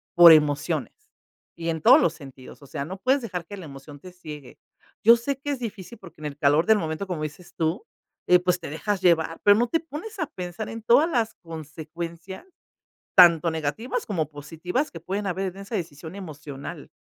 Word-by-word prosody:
por 175 -1 +10
emociones 150 -2 +1 0.6
y 165 0 -4
en 160 -2 -2
todos - - +8
los 165 - +2
sentidos, 135 -3 -13
o 140 - -13
sea, 140 - -4
no 190 +4 -7
puedes 260 +6 +2
dejar 180 -7 -5
que 205 - -8
la 185 - -9
emoción 140 0 -11
te 185 +3 -12
ciegue. 150 -7 -10 0.5
Yo 230 +2 +8
sé 275 +4 -2
que 290 +1 -6
es 280 - -2
difícil 225 -1 -7
porque 170 -4 -14
en - - -6
el 145 0 -8
calor 145 +3 +3
del 220 - +6
momento, 160 +3 -4
como 165 -4 -3
dices 155 +4 -8
tú, 165 - -1 0.4
eh, 180 - +7
pues 180 0 0
te 165 - -7
dejas 195 +6 -2
llevar, 165 -2 +2
pero 205 0 +6
no 240 +1 +2
te 330 - +1
pones 365 +7 -8
a 320 - -1
pensar 185 - -6
en 225 -1 -7
todas 275 +9 +5
las 230 -6 0
consecuencias, 165 - -8 0.7
tanto 170 -2 +7
negativas 160 - -3
como 165 -8 -1
positivas, 165 - -3
que 165 - -9
pueden 195 +4 -3
haber 190 0 -3
en - - -13
esa 200 +3 -6
decisión 165 -2 -6
emocional. 145 -7 -8
175 Hz, 200 wpm, -25 LUFS, 155-205 Hz, 0.7 s, por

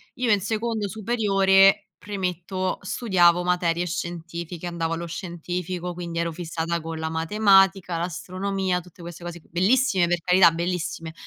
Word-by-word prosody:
Io, 245 -3 0
in 205 - +4
secondo 220 +1 -2
superiore, 195 -2 +3
premetto, 185 -2 -3
studiavo 180 -4 +3
materie 175 -1 0
scientifiche, 170 0 -5
andavo 165 -1 -2
allo 170 +1 -4
scientifico. 180 +1 -5
Quindi 170 -1 -5
ero 170 0 -1
fissata 165 0 -3
con 165 0 -6
la 160 0 -2
matematica, 195 +1 +3
l'astronomia, 185 +2 -2
tutte 180 0 -17
queste 170 0 -9
cose, 175 0 -7
bellissime 190 +1 +2
per 175 0 +1
carità, 180 -1 +5
bellissime, 170 -1 -3
180 Hz, 135 wpm, -24 LUFS, 170-195 Hz, -, carità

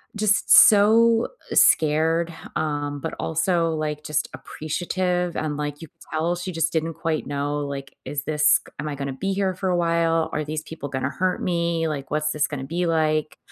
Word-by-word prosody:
just 210 0 +1
so, 225 +3 +6 0.2
uh, - - -2
scared, 160 +2 +3 0.2
um, 145 -2 -2
but 160 - -4
also 165 0 0
like 150 -1 -3
just 150 0 -1
appreciative 180 +2 -2
and 150 -2 -2
like 145 +1 -4
you - - -9
could - - -38 0.2
tell 165 +3 0
she 180 +1 -5
just 165 -1 -1
didn't 160 0 -1
quite 160 -2 -2
know 145 +1 -2
like, 140 -1 -6
"Is 145 0 -4
this 150 -1 +4
k - - -18
am 150 - -3
I 145 - -4
going 140 0 -4
to - - -4
be 195 +8 -2
here 190 -1 0
for 190 0 -2
a 175 - +1
while? 165 -1 +1
Are 155 - -1
these 155 0 -4
people 150 -3 -7
gonna 130 0 -2
hurt 185 +6 -1
me? 170 -2 0
Like, 140 -3 -4
what's 150 0 0
this 150 -1 0
going 145 -3 -5
to - - -5
be 175 +1 -1
like?" 155 -2 0
160 Hz, 205 wpm, -23 LUFS, 150-175 Hz, 0.2 s, so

